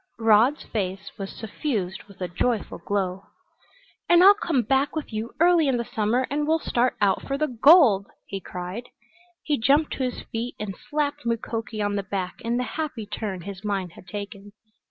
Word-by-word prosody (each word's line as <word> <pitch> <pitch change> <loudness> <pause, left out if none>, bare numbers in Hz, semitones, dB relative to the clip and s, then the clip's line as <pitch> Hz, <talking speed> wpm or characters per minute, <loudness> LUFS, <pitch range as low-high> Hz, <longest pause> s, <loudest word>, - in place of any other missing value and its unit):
Rod's 225 +5 +4
face 190 -2 -4
was 195 -1 -5
suffused 210 -4 -3
with 200 -2 -17
a 180 - -1
joyful 215 +5 -1
glow. 195 -1 -2 0.8
"And 345 +1 +7
I'll 400 +2 +10
come 330 - 0
back 270 +6 +1
with 305 -7 -4
you 220 +3 -4
early 340 -2 +5
in 260 -2 +2
the 235 - -2
summer 225 +5 0
and 295 +1 0
we'll 320 +1 +4
start 250 -5 0
out 200 -2 +2
for 275 - -1
the 305 - +1
gold," 250 - +6 0.2
he 195 - -5
cried. 185 +6 -7 0.5
He 295 -4 0
jumped 285 +7 +3
to 265 - -2
his 250 -1 -3
feet 230 +2 -3
and 200 -3 -4
slapped 295 0 -1
Mukoki 225 -1 -2
on 205 0 0
the - - 0
back 190 -1 -4
in 235 +1 -1
the 250 - 0
happy 270 -6 -4
turn 205 -3 -4
his 195 +2 -8
mind 195 -4 -2
had 180 - -15
taken. 205 -1 -7
225 Hz, 185 wpm, -25 LUFS, 200-275 Hz, 0.8 s, I'll